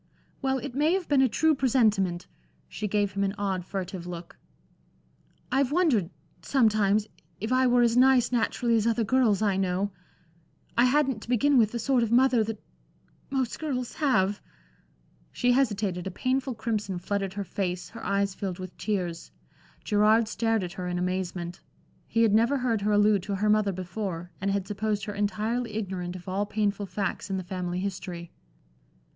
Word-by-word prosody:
"Well, 265 -1 +1
it 245 - -6
may 300 +5 +2
have 375 -2 -1
been 280 -2 +4
a 260 - +4
true 315 +7 +3
presentiment." 215 -10 +2 0.4
She 215 - -4
gave 205 0 +1
him 200 +1 -1
an 195 +1 -1
odd, 195 -3 -1
furtive 185 -1 -5
look. 170 -1 -8 1.2
"I've 270 0 +2
wondered 290 - +2 0.3
sometimes 215 -5 +2 0.3
if 220 +4 -3
I 255 0 +4
were 245 0 +4
as 235 -1 +3
nice 250 -1 +5
naturally 235 0 +1
as 225 0 +2
other 230 0 +2
girls 220 -3 +2
I 200 -3 +2
know. 190 +1 0 0.8
I 235 - +5
hadn't, 265 -3 +2
to - - -12
begin 275 +4 +3
with, 220 -4 +4
the 240 - -3
sort 250 +2 +2
of 230 -1 0
mother 245 -1 +4
that 220 -1 -5 0.7
most 260 -3 -1
girls 255 -6 -3
have" 205 -9 +2 0.9
She 245 - +1
hesitated, 205 -8 0
a - - -1
painful 255 +6 -1
crimson 215 -4 -2
flooded 195 +1 -2
her 205 0 -3
face, 180 -1 -3
her - - -10
eyes 200 0 0
filled 190 -2 -4
with 185 -1 -8
tears. 180 -6 -3 0.5
Gerard 215 +1 +3
stared 225 -2 0
at 175 -1 -5
her 180 -1 -5
in 180 0 -2
amazement. 180 -1 -3 0.5
He 230 - +2
had 220 -3 +3
never 230 +6 +3
heard 240 -5 0
her 210 +1 +1
allude 205 -1 +4
to 200 +2 -3
her 210 +2 +2
mother 210 -1 +3
before, 180 -1 -5
and 200 - 0
had 195 -1 -1
supposed 205 -1 -2
her 205 - -5
entirely 215 +3 -1
ignorant 185 -4 -4
of 180 +1 -10
all 195 +2 -1
painful 205 -1 -1
facts 195 +2 -3
in 195 - -1
the 185 - -4
family 180 -1 -3
history. 180 -3 -5
210 Hz, 175 wpm, -27 LUFS, 190-240 Hz, 1.2 s, nice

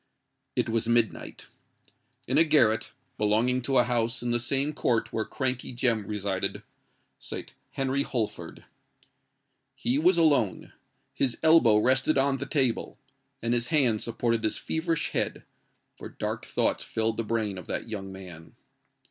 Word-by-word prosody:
It - - +1
was 115 0 0
midnight. 120 -1 0 0.8
In - - +2
a - - +8
garret, 135 -9 +3 0.3
belonging 115 +5 +2
to 135 +2 0
a 125 - +6
house 120 0 -1
in 120 - -1
the 120 - +2
same 135 +5 0
court 115 -5 0
where 110 -1 -1
Crankey 130 -1 -3
Jem 115 -5 0
resided, 100 -3 -2 0.6
sate - - -7 0.2
Henry 135 +1 0
Holford. 120 -6 -4 1.1
He 130 +4 0
was 175 +3 +4
alone. 145 - +2 0.4
His 125 -4 -1
elbow 160 -10 +6
rested 130 +6 +2
on 135 0 +2
the - - -5
table, 130 -5 0 0.5
and 115 0 +1
his 120 0 0
hand 130 -9 +2
supported 115 -1 -1
his 110 - 0
feverish 165 0 -1
head—for - - -6
dark - - -4
thoughts - - 0
filled 110 0 -1
the 115 - -1
brain 110 -4 -2
of 90 - -12
that - - -3
young 100 -3 -6
man. 90 -4 -11
120 Hz, 145 wpm, -27 LUFS, 110-135 Hz, 1.1 s, a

